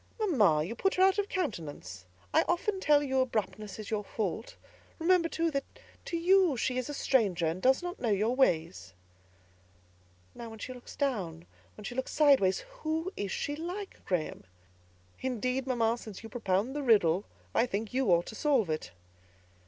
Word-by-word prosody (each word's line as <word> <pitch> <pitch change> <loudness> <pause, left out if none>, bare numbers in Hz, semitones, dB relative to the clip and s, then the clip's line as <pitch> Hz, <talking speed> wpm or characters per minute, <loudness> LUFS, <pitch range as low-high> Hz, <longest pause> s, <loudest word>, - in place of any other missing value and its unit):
"Mamma, 215 - +3
you 185 +8 -4
put 385 +10 0
her 370 - +4
out 385 +1 +4
of 410 - -1
countenance. 150 - -4 0.3
I - - +5
often 380 +3 0
tell 295 -5 +4
you 265 -2 0
abruptness 210 -4 -3
is 215 -1 -7
your 210 -1 -1
fault; 215 +2 -4 0.4
remember, 335 0 +3
too, 330 0 0
that 275 -2 -1 0.4
to 340 - -2
you 360 -4 +4
she 255 +2 0
is 255 - -4
a - - -3
stranger, 200 -12 +2
and 165 +3 -1
does 265 +5 +3
not 355 +2 -5
know 240 - -1
your 215 +4 +1
ways." 160 - +1 1.4
"Now, 235 -1 -8
when 225 - -10
she 255 +4 -6
looks 250 -1 -12
down; 195 - -2
now, - - -21 0.3
when 210 - -10
she 225 - -5
turns 260 +1 -3
sideways, 275 -11 +4 0.2
who 320 +3 -2
is 200 -2 -3
she 290 - -2
like, 360 +6 -6
Graham?" 175 - -2 0.7
"Indeed, 255 +1 -2
mamma, 235 -2 +1
since 215 -2 -9
you 225 - -8
propound 220 +2 -1
the 295 - -1
riddle, 200 - +3 0.3
I 235 - +3
think 210 +1 -3
you 260 -1 +1
ought 170 0 +4
to - - -8
solve 250 - +2
it!" 155 - -3
245 Hz, 180 wpm, -30 LUFS, 195-295 Hz, 1.4 s, I